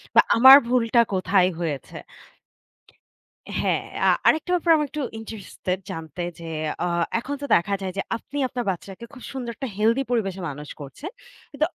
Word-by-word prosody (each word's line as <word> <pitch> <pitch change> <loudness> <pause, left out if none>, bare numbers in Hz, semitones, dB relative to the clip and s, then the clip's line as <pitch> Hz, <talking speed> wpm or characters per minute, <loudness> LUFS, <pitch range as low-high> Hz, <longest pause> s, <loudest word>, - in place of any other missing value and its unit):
বা - - +9 0.2
আমার 265 +3 +11
ভুলটা 240 -1 +3
কোথায় 185 0 +3
হয়েছে?" 155 -5 -4 1.6
হ্যাঁ, - - 0 0.2
আ - - +6 0.2
আরেকটা 320 +3 +2
ব্যাপারে 335 -2 +4
আমি 300 - 0
একটু 300 - -4 0.2
ইন্টারেস্টেড 200 -4 -5
জানতে 165 +2 -6 0.2
যে, 165 - -8 0.4
আ - - +1 0.3
এখন 275 +5 -5
তো 285 - -3
দেখা 195 +4 +1
যায় 190 - -3
যে, - - +1 0.2
আপনি 285 - -9
আপনার 245 -1 -4
বাচ্চাকে 195 +5 -8
খুব 250 - -12
সুন্দর 245 -3 -4
একটা 265 - -5
হেলথি 230 +5 +2
পরিবেশে 195 -6 -1
মানুষ 150 +1 -8
করছেন। 145 - -8 0.4
কিন্তু 295 +2 +1
225 Hz, 160 wpm, -24 LUFS, 185-270 Hz, 1.6 s, আমার